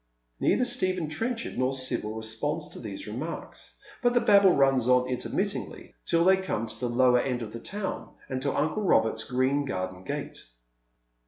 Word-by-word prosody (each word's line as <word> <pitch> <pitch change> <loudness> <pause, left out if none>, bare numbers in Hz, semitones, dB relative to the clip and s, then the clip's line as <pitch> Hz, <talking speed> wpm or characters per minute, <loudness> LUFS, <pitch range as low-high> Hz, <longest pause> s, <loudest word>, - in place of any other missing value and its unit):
Neither 250 - +2
Stephen 185 -8 +1
Trenchard 225 - -3
nor 130 +1 +1
Sibyl 120 -5 -2
responds 110 +8 -3
to - - -9
these 100 -4 -7
remarks, 130 +11 -6 0.2
but 245 0 +2
the - - +6
babble 200 -4 +6
runs 135 -3 +3
on 125 0 +4
intermittingly 160 - -3
till 170 0 +3
they 190 +1 +6
come 190 - -2
to 110 0 -5
the 125 - -1
lower 125 0 +4
end 125 -2 -2
of 110 -1 -8
the 115 - -6
town, 200 - -5
and 130 -1 -3
to 140 0 0
uncle 155 +8 0
Robert's 110 - +2
green 130 +4 +1
garden 95 -7 -4
gate. - - -5
130 Hz, 170 wpm, -27 LUFS, 115-185 Hz, 0.2 s, the